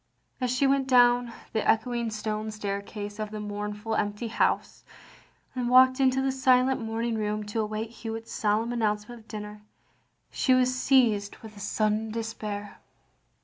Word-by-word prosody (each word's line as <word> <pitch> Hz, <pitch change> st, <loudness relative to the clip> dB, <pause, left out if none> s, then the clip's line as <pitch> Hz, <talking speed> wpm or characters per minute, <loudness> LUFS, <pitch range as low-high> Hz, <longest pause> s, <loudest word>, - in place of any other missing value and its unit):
As 250 Hz, -, +1 dB
she 255 Hz, +3 st, +2 dB
went 270 Hz, 0 st, +2 dB
down 245 Hz, -1 st, +5 dB, 0.2 s
the 220 Hz, -, 0 dB
echoing 235 Hz, +1 st, +1 dB
stone 215 Hz, 0 st, -3 dB
staircase 205 Hz, 0 st, -5 dB
of 215 Hz, -1 st, -3 dB
the 215 Hz, 0 st, -6 dB
mournful 210 Hz, +1 st, -4 dB
empty 210 Hz, +2 st, -1 dB
house, -, -, 0 dB, 0.7 s
and 250 Hz, -2 st, -2 dB
walked 255 Hz, +1 st, +6 dB
into 265 Hz, 0 st, +3 dB
the 270 Hz, -, +1 dB
silent 260 Hz, -1 st, +3 dB
morning 225 Hz, +1 st, -2 dB
room 215 Hz, -1 st, -2 dB
to 210 Hz, +2 st, -4 dB
await 215 Hz, +1 st, -3 dB
Hewitt's 225 Hz, -1 st, -7 dB
solemn 220 Hz, +3 st, 0 dB
announcement 220 Hz, 0 st, -2 dB
of 220 Hz, -, -26 dB
dinner, 210 Hz, -1 st, -7 dB, 0.7 s
she 260 Hz, -, +3 dB
was 255 Hz, 0 st, +3 dB
seized 235 Hz, -6 st, +2 dB
with 215 Hz, -1 st, -10 dB
a -, -, -11 dB
sudden 215 Hz, +2 st, 0 dB
despair. 215 Hz, -2 st, -5 dB
225 Hz, 150 wpm, -27 LUFS, 210-245 Hz, 0.7 s, walked